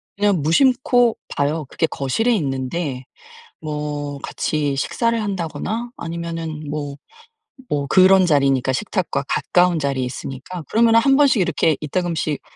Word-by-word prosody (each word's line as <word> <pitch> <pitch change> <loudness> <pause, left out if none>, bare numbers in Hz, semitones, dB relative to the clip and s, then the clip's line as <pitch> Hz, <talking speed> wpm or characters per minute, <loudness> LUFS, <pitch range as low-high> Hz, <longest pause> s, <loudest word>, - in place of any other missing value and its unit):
그냥 200 -4 +1
무심코 245 - +3 0.2
봐요. 150 +1 -1
그게 160 - 0
거실에 190 - 0
있는데 135 -3 -3 0.6
뭐 150 -2 -4
같이 145 -2 -2
식사를 230 - 0
한다거나 200 +4 -3
아니면은 165 -2 -5
뭐 145 -1 -4 0.7
뭐 145 -1 -1
그런 190 +3 +6
자리니까 135 -5 +2
식탁과 180 -3 -2
가까운 180 -1 +2
자리에 140 -3 -1
있으니까. 135 +7 -6
그러면 225 0 +4
1 270 +4 +5
번씩 275 -7 +4
이렇게 165 -3 +1
이따금씩 160 -1 -2
160 Hz, 295 characters per minute, -20 LUFS, 145-195 Hz, 0.7 s, 그런